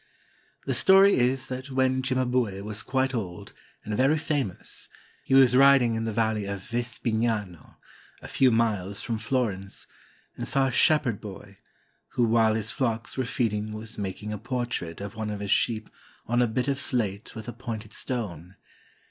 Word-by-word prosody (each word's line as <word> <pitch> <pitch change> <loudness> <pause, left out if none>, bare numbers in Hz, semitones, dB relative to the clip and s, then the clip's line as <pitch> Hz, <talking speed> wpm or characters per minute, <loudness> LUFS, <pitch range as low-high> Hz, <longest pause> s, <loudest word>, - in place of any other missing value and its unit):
The - - 0
story 195 +1 +6
is 130 +2 +1
that 130 +1 -5
when 130 0 +1
Cimabue 125 -6 0
was 105 0 -3
quite 135 0 0
old 95 -7 -5 0.3
and 105 - -2
very 135 +7 +3
famous, 145 - -3 0.3
he 135 - +1
was 130 -2 +6
riding 135 -3 +6
in 115 0 -2
the 115 - -1
valley 110 -1 0
of 100 -1 -5
Vespignano, 115 - -2 0.4
a - - -10
few 130 - +3
miles 105 -4 0
from 115 -2 -2
Florence, 110 -5 -2 0.5
and - - -4
saw 135 -1 +3
a 130 - 0
shepherd 125 -3 +3
boy, 100 -1 -10 0.6
who 120 - +2
while 115 -1 +3
his 110 0 -1
flocks 115 -3 -2
were 130 - -1
feed 115 -2 0
ing 105 +1 -3
was 110 +1 -7
making 100 +2 -4
a 105 - -5
portrait 120 -8 -3
of 100 - -6
one 110 -1 -3
of 105 -1 -4
his 100 -1 -3
sheep 110 -2 +1 0.4
on 120 +2 +1
a 120 - +3
bit 125 +4 -1
of 140 0 0
slate 105 -5 -2
with 110 -1 -7
a 120 - -5
pointed 115 -3 -7
stone 95 -8 -5
115 Hz, 175 wpm, -26 LUFS, 105-130 Hz, 0.6 s, story